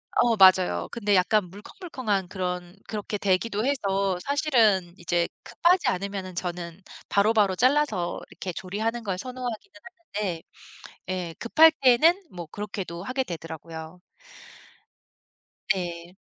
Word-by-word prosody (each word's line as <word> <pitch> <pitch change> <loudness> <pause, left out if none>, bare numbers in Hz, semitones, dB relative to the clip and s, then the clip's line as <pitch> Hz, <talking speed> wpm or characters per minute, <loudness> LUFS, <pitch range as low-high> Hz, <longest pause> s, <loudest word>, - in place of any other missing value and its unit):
어 235 -1 +4
맞아요. 185 - +5
근데 210 -3 0
약간 185 +1 +2
물컹물컹한 210 - -4
그런 180 -1 -4
그렇게 210 -1 -4
되기도 205 +3 0
해서 195 -8 0
사실은 225 - +2
이제 175 0 0 0.2
급하지 360 +2 +2
않으면은 190 0 -3
저는 175 0 -5 0.3
바로바로 205 -1 +3
잘라서 250 -7 +1
이렇게 185 - -5
조리하는 220 +7 -3
걸 195 -4 -2
선호하기는 250 - -6 0.5
하는데 175 -5 -3 0.7
예. 180 -3 -3
급할 315 +7 +6
때는 310 +9 +5
뭐 175 -2 -7
그렇게도 195 -4 -5
하게 255 +5 -1
되더라고요. 165 - -8 1.7
예. 175 -1 -6
195 Hz, 285 characters per minute, -26 LUFS, 180-235 Hz, 1.7 s, 급할